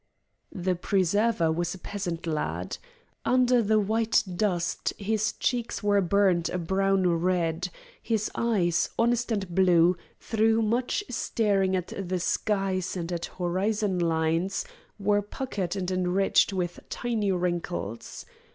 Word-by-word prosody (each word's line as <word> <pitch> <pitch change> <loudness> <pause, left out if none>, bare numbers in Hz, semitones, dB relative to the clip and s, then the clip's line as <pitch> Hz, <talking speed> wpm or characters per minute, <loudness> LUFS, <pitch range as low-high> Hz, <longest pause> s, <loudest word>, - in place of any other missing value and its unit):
The 185 -1 -1
preserver 190 0 +1
was 175 +2 -1
a - - -9
peasant 180 -3 -5
lad. 155 -2 -3 0.4
Under 250 -1 +4
the 215 0 +3
white 220 +2 +2
dust 175 -3 0
his 215 +1 0
cheeks 240 -3 -2
were 205 -1 +3
burned 185 -2 +2
a - - -2
brown 190 +2 +1 0.2
red, 175 -1 0 0.3
his 220 -2 -1
eyes, 185 -8 +1
honest 240 +1 +1
and 195 -5 -2
blue, 180 -1 +5 0.2
through 225 0 +2
much 245 - 0
staring 200 -5 +1
at 180 -1 -3
the 185 -2 -2
skies 190 -1 -1
and 170 0 -4
at 170 -1 -2
horizon 190 +2 0
lines, 165 +3 0 0.3
were 205 0 +2
puckered 205 -4 -4
and 185 -2 -2
encircled 185 +2 +2
with 175 -1 -2
tiny 220 -5 -1
wrinkles. 175 - -3
190 Hz, 125 wpm, -27 LUFS, 175-215 Hz, 0.4 s, blue